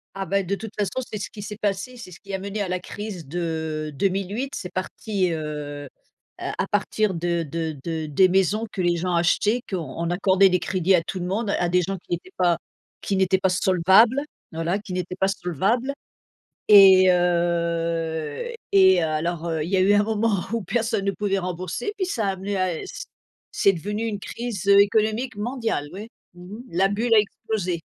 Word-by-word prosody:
Ah 195 0 -4
bah 195 +3 +1
de 190 +2 -3
toute 220 +2 -4
façon 205 +5 -1
c'est 210 - -3
ce 195 - -6
qui 210 - -9
s'est 210 0 -7
passé, 210 +4 -2
c'est 230 -6 -10
ce 175 - -12
qui 195 -1 -6
a - - -4
mené 200 +2 -4
à 195 - -1
la 185 0 -1
crise 200 -5 -7
de 160 -1 -3
2008, 195 - -1
c'est 180 - -5
parti, 185 0 -2
heu, 150 -2 -5 0.5
à 190 - -3
partir 205 0 0
de 170 0 -1
de 160 0 -4
de 160 -2 -3
des 185 +6 +4
maisons 195 +4 +2
que 195 - -4
les 175 -1 +2
gens 180 +1 -1
achetaient, 205 +7 +2
qu'on 170 -3 -3
accordait 190 +2 +4
des 180 -1 +1
crédits 185 +1 +1
à 175 - +4
tout 185 +2 -5
le 175 - -3
monde, 200 +3 -1
à 175 - 0
des 180 +1 +3
gens 195 +2 -3
qui 175 - -12
n'étaient 175 +2 -4
pas 175 -2 +3 0.5
qui 195 - -1
n'étaient 190 0 +3
pas 190 0 +1
solvables, 190 +8 +4 0.3
voilà, 165 +4 -1
qui 200 -3 -7
n'étaient 180 0 -3
pas 190 - +3
solvables. 195 - 0 0.8
Et 190 -3 +8
heu 170 - 0 0.2
et 190 -2 +6
heu - - +1
alors 165 +2 -2
heu, 160 -2 -1
il 165 - -5
y 195 - +2
a - - +3
eu 190 +2 +4
un 205 0 +4
moment 215 -2 0
où 230 - -1
personne 225 +1 -1
ne 200 - +2
pouvait 195 -1 -1
rembourser 185 - -4
puis 380 - 0
ça 230 - -1
a 195 - +2
amené 195 +1 -4
à 185 -3 -1
c - - -8 0.5
c'est 195 - +4
devenu 205 +6 -4
une 210 -3 -3
crise, 215 -2 -5
heu, 200 0 +7
économique 215 +3 +1
mondiale 225 - -2
oui, 205 +4 -7 0.3
mmh 175 - -12
mh, - - -9
la 185 +3 +3
bulle 225 +4 +1
a - - +8
explosé. 200 -4 -2
190 Hz, 200 wpm, -24 LUFS, 170-205 Hz, 0.8 s, Et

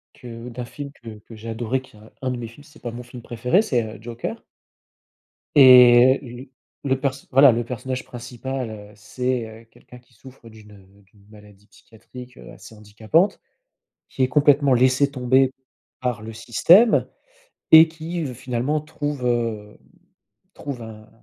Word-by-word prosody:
que 120 0 -10
d'un 120 +1 -7
film 140 +3 -9
que 115 -5 -12
que 110 +2 -15
j'ai 115 +1 -9
adoré, 120 +3 -3
qui 120 - -20
est - - -17
un 110 - -18
un 130 - -1
de 125 - -4
mes 120 - -6
films, 115 +6 -16
si 150 - -20
c'est - - -19
pas 120 - -5
mon 120 +2 -9
film 120 0 -12
préféré 125 - 0
c'est, 125 - -1
heu, 110 -1 -9
Joker. 120 +1 -7 1.1
Et 125 -1 +7
heu, - - -10
l 130 - -14 0.4
le 130 -1 +1
pers 135 0 0 0.2
voilà 135 +1 +7
le 120 0 -2
personnage 125 +1 -5
principal, 125 +1 -6
heu, 105 -1 -11
c'est, 125 +3 -3 0.2
heu, - - -26
quelqu'un 125 +2 -18
qui 120 0 -30
souffre 125 +1 -16
d'une, 110 -1 -16
heu, 100 0 -20
d'une 100 +1 -26
maladie 105 -1 -18
psychiatrique, 125 +4 -15
heu, - - -13
assez - - -14
handicapante, 110 - -1 0.7
qui 135 - -4
est 130 - +2
complètement 140 -1 +3
laissé 130 +3 +2
tomber 130 0 +1 0.5
par 125 -4 -3
le 110 +1 -8
système 170 - +4 0.6
et 160 +1 +9
qui 165 +1 -6
v 130 - -6
finalement, 125 +5 -2
trouve, 150 -3 -5
hem, 115 -3 -2 0.8
trouve 135 -5 -7
un 110 -1 -12
125 Hz, 175 wpm, -22 LUFS, 115-135 Hz, 1.1 s, et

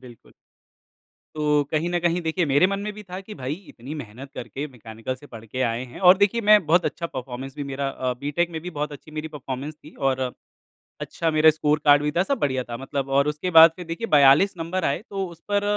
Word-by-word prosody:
बिल्कुल। 125 -3 -15 1.0
तो, 150 -1 +2
कहीं 160 +3 0
न 175 0 0
कहीं 175 +1 +1
देखिए 165 +1 0
मेरे 145 +5 +4
मन 195 0 -2
में 210 +1 -4
भी 210 0 -10
था 185 0 -7
कि 210 +2 -10
भाई 130 +2 -4 0.2
इतनी 130 +6 -9
मेहनत 125 +6 -11
करके 125 +5 -5
मैकेनिकल 115 0 -7
से 135 - -16
पढ़ 115 -1 -11
के 130 +4 -4
आए 115 +2 -3
हैं - - -9
और 185 - +8
देखिए 205 +3 +2
मैं 210 -5 +7
बहुत 170 +1 +3
अच्छा 160 +2 -3
परफ़ॉर्मेंस 130 -1 -7
भी 145 - -4
मेरा 135 +1 -2
अ 130 -2 -2
बी-टेक 150 +5 -1
में 160 - -4
भी 180 - -6
बहुत 150 -1 -3
अच्छी 145 +2 -12
मेरी 155 +1 -4
परफ़ॉर्मेंस 140 0 -6
थी 150 0 -16 0.2
और 130 0 -1 0.8
अच्छा 165 -1 -2
मेरा 155 0 +6
स्कोर 150 0 +1
कार्ड 145 0 +6
भी 150 - 0
था, 175 +4 +1
सब 280 +6 -1
बढ़िया 130 -3 0
था 120 -1 -7
मतलब 135 +1 -4
और 140 +1 +3
उसके 150 +5 -2
बाद 165 0 +10
फिर 180 -2 -8
देखिए 165 +8 -4
42 145 +8 +6
नंबर 170 +2 -2
आए 140 +7 0
तो 195 -1 -3
उस 170 -1 -13
पर 205 0 +2
150 Hz, 230 wpm, -24 LUFS, 135-175 Hz, 1.0 s, बाद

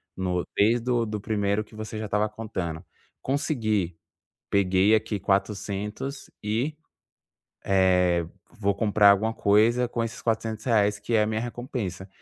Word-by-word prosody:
no 90 -2 -1
mês 115 +4 +4
do 120 -1 +1
do 105 -1 -4
1º 100 0 0
que 110 - -17
você 110 0 -6
já 110 - -3
estava 105 +1 0
contando, 95 -7 -5 0.4
consegui. 110 - -1 0.5
Peguei 100 +2 +4
aqui 110 -1 -1
400 100 +6 -2 0.2
e, 115 +9 -1 0.9
eh, 90 -3 +3 0.3
vou 100 -2 +1
comprar 105 -1 +5
alguma 110 +3 0
coisa 115 +4 +3
com 120 -1 -2
esses 115 -1 -5
R$400 110 -2 +1
que 110 +3 -3
é 110 - +5
a - - +1
minha 110 0 -1
recompensa. 120 - -5
105 Hz, 140 wpm, -26 LUFS, 100-115 Hz, 0.9 s, comprar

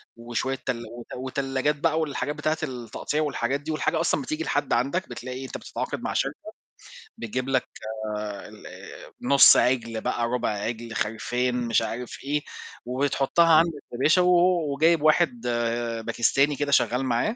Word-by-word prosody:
وشوية 120 +3 -3
تلا 115 -3 -3
وت 120 0 -10
وتلّاجات 135 +2 -1
بقى 160 +2 +1
والحاجات 145 -2 -2
بتاعة 155 +1 -1
التقطيع 130 +2 -3
والحاجات 140 -2 -1
دي 155 +2 -4
والحاجة 155 +1 0
أصلًا 165 -3 +1
بتيجي 155 +4 -3
لحد 145 -2 0
عندك، 140 +10 0
بتلاقي 125 +2 -6
أنت 130 - -6
بتتعاقد - - -5
مع - - -3
شركة - - 0 0.8
بتجيب 125 +3 -3
لك 130 -2 +1 0.8
الأ - - -12
نُص 140 +2 +7
عِجل 115 -3 +1
بقى 120 -1 -1
رُبع 125 0 -1
عِجل 115 +2 -4
خِرفان 120 +4 -1
مش 115 - +3
عارف 120 +1 -5
إيه 145 +2 -1 0.4
وتحطّها 140 +6 +2
عند 165 +2 +5 0.2
الفلاشة 155 +9 +3
و 180 - +3
و 175 -4 +3
وجايب 160 +2 +3
واحد 155 -5 +3 0.6
باكستاني 135 +5 +2
كده 145 0 -2
شغّال 130 -1 +2
معاه، 125 - 0
135 Hz, 150 wpm, -25 LUFS, 120-150 Hz, 0.8 s, نُص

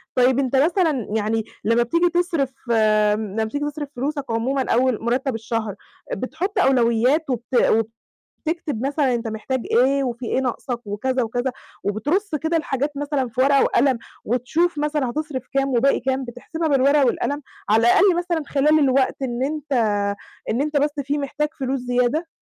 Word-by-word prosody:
طيب 255 +1 +4
أنت 265 -1 0
مثلًا 310 - +2
يعني 220 +1 0 0.2
لمّا 230 +2 +3
بتيجي 335 +8 +2
تصرف 335 -7 0 0.2
امم، 215 -2 +2
لمّا 220 +1 0
بتيجي 285 +7 -3
تصرف 295 -1 -5
فلوسك 285 +3 -2
عمومًا 255 +3 -1
أول 250 -2 +2
مُرتَّب 250 +2 0
الشهر، 225 -2 -3 0.4
بتحُط 345 - -3
أولويات 255 +4 +3
وبت 245 +1 -3 0.9
وتكتب 310 -7 -2
مثلًا 280 -3 +1
أنت 230 -1 -2
محتاج 220 +4 -3
إيه 270 +3 +3
وفي 240 -1 -4
إيه 260 - 0
ناقصك 250 -1 -3
وكذا 255 +6 -1
وكذا، 245 +3 -2 0.3
وبترُص 300 - -1
كده 320 +3 0
الحاجات 290 -2 -1
مثلًا 285 -2 -1
في 235 +3 -4
ورقة 275 +1 +5
وقلم، 260 -1 +2 0.3
وتشوف 295 +8 0
مثلًا 295 -3 0
هتصرف 300 -1 -4
كام 275 0 +2
وباقي 265 +2 +2
كام، 265 +1 -1
بتحسبها 310 +7 -4
بالورقة 280 +1 +4
والقلم، 285 +4 -1 0.3
على 220 - +5
الأقل 380 +6 +5
مثلًا 345 -2 -1
خلال 295 +3 +3
الوقت 270 -1 +2
إن 245 -1 -2
أنت 295 0 -4 0.8
إن 230 +4 0
أنت 300 0 -2
بس 290 +1 +3
فيه 290 +2 -1
محتاج 290 +2 -2
فلوس 265 0 -1
زيادة؟ 250 +6 0
265 Hz, 160 wpm, -22 LUFS, 240-295 Hz, 0.9 s, ورقة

